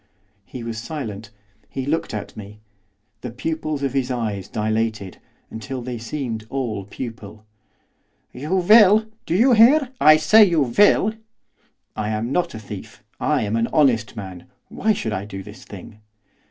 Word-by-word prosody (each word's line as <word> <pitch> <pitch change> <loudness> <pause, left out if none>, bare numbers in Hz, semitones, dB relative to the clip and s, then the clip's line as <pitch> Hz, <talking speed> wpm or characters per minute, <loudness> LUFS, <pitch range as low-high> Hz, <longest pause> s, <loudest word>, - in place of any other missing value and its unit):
He 125 -3 -8
was 115 -1 -5
silent. 110 -6 -6 0.4
He 135 - -5
looked 155 +4 -1
at 105 -2 -6
me. 105 0 -10 0.6
The 125 - -5
pupils 150 +3 -4
of 135 -2 -1
his 135 -2 -1
eyes 110 -6 -3
dilated, 110 -3 -2 0.3
until 120 +3 -6
they 120 -1 -5
seemed 115 -3 -5
all 115 -8 -3
pupil. 110 -1 -9 0.9
'You 150 +9 -3
will. 210 +3 +6 0.2
Do 165 - 0
you 245 +6 +5
hear? 250 +5 +5
I 155 +1 +8
say 215 +9 +6
you 170 -6 +3
will.' 205 - +3 0.8
'I 105 -1 -3
am 110 +3 -2
not 175 -4 -1
a - - -6
thief, 105 -2 -10 0.2
I - - +1
am 105 +1 -2
an 115 0 +1
honest 120 -8 +2
man, 95 -4 -9 0.2
why 220 +1 0
should 110 - -3
I 100 - -3
do 95 -2 -8
this 105 +6 -13
thing? 105 +2 -12
120 Hz, 155 wpm, -21 LUFS, 110-155 Hz, 0.9 s, I